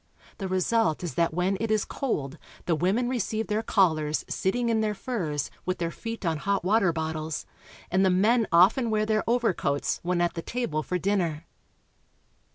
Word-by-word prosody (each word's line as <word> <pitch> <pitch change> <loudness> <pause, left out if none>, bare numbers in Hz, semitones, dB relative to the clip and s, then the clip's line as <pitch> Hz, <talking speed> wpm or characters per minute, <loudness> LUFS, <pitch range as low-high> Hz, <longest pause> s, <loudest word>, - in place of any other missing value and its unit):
The 195 - -3
result 185 -2 +1
is 175 - -3
that 170 +5 +1
when 180 +4 0
it 225 +1 -2
is 215 -1 +1
cold 155 - -3 0.3
the 170 - +1
women 190 +10 +1
receive 225 -3 -1
their 210 +1 -1
callers 160 -8 +1
sitting 235 +5 0
in 225 -1 +2
their 210 -1 0
furs, 175 - -3
with 185 0 -2
their 170 -1 -2
feet 230 0 -6
on 165 -2 +1
hot 200 +4 -1
water 195 -2 +3
bottles, 160 -1 -3 0.5
and 190 +2 +3
the 190 - +4
men 215 +5 +3
often 195 +8 +5
wear 215 -1 +1
their 215 0 +1
overcoats 225 -12 0
when 175 0 0
at 175 0 +1
the 165 - -4
table 230 -8 -2
for 180 +4 -2
dinner. 175 -5 -1
190 Hz, 175 wpm, -27 LUFS, 165-220 Hz, 0.5 s, often